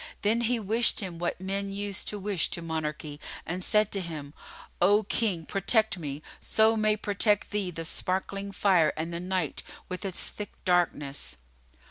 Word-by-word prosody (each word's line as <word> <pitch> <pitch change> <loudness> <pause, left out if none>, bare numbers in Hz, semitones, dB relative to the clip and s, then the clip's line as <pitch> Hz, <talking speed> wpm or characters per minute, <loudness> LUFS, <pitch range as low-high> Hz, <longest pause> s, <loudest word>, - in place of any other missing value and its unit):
Then 220 +3 +3
he 235 +1 +1
wished 225 +3 +4
him 180 -6 -4
what 175 +1 -2
men 195 +1 -2
use 200 0 -1
to 210 - -1
wish 200 -3 +1
to 170 - -3
monarchy 155 -2 -4 0.3
and 180 +2 -3
said 210 +1 +3
to 195 - 0
him, 150 -5 -6 0.5
"O 205 +4 +5
King, 195 -5 0
protect 210 +2 +2
me, 145 -1 -5 0.2
so 220 +1 +4
may 215 -1 +3
protect 205 0 +2
thee 205 -3 0
the 165 -1 -5
sparkling 195 +3 -2
Fire 185 -5 +3
and 165 +2 -3
the 170 - -2
Night 180 -3 -1 0.3
with 185 +2 -4
its 190 -3 0
thick 210 -1 -7
darkness!" 150 - 0
190 Hz, 165 wpm, -28 LUFS, 170-210 Hz, 0.5 s, O